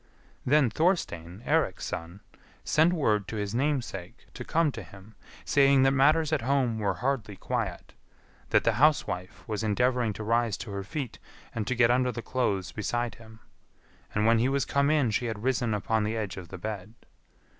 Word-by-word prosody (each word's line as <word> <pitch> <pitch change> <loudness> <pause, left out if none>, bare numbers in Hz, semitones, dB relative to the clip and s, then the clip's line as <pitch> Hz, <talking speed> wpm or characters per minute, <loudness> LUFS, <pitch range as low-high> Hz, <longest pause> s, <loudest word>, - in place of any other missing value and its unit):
Then 140 -3 +4
Thorstein, 110 - -1
Eirik's - - +1
son, 85 +4 -6 0.4
sent 160 +3 +3
word 110 - +1
to - - -5
his 105 -1 -3
namesake 125 -9 -2
to - - -7
come 165 -2 +1
to 115 - -7
him, 95 +3 -14 0.3
saying 140 -1 +5
that 135 - +5
matters 150 +3 +3
at 150 - +1
home 125 -3 +1
were 100 -3 0
hardly 120 -3 -2
quiet; - - -4 0.6
that - - +3
the 115 - +3
housewife 145 -12 +1
was 105 -1 -2
endeavouring 120 +2 +1
to 110 - -6
rise 115 -1 +1
to 110 - -7
her 100 0 -4
feet 130 +4 -5 0.3
and 110 -2 -3
to 130 - 0
get 120 0 +4
under 125 0 +2
the 120 -1 -6
clothes 100 -7 -1
beside 120 +2 -2
him. 110 0 -15 0.7
And 105 0 +2
when 115 0 +5
he 125 +3 +2
was 140 0 +1
come 140 0 +2
in 145 -7 +2
she 120 +3 0
had 110 -2 -5
risen 125 -2 +1
upon 110 +1 0
the 110 +2 -1
edge 105 -5 -3
of 90 -2 -8
the 90 - -8
bed. 105 +2 -6
115 Hz, 185 wpm, -28 LUFS, 105-135 Hz, 0.7 s, saying